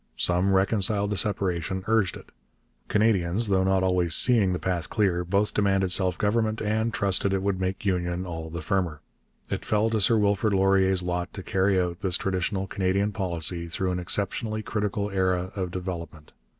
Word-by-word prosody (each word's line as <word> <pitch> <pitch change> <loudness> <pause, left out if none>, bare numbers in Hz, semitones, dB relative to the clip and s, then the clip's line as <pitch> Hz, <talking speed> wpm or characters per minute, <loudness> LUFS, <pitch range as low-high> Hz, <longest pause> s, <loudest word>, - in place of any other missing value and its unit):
Some, 90 +2 +2
reconciled 100 +1 +2
to - - 0
separation, 95 -2 -1
urged 110 -6 +1
it. - - -16 0.6
Canadians, 105 -1 +1
though 95 -1 +2
not 95 0 +2
always 90 -3 +2
seeing 115 -7 +4
the 90 - -1
path 90 -3 -2
clear, 95 -5 +1
both 100 +4 0
demanded 95 -2 +1
self 90 -1 +2
government 110 +1 0
and 110 +2 -1
trusted 100 -1 +1
it 95 -1 -1
would 100 -2 -1
make 95 +2 -3
union 90 -1 -1
all 80 -2 -6
the 85 0 -6
firmer. 85 -3 -1 0.5
It - - -3
fell 110 +1 +1
to 110 -2 0
Sir 110 +4 +4
Wilfrid 105 0 +1
Laurier's 95 -1 +3
lot 90 0 -3
to 95 - -7
carry 95 0 +1
out 90 -1 -2
this 95 -4 +2
traditional 95 +1 -2
Canadian 95 +2 0
policy 85 -4 -2
through 90 +3 -2
an 90 - -2
exceptionally 110 +4 -2
critical 105 -1 -2
era 95 -1 0
of 95 -3 -3
development. 85 -4 -7
95 Hz, 175 wpm, -26 LUFS, 90-100 Hz, 0.6 s, seeing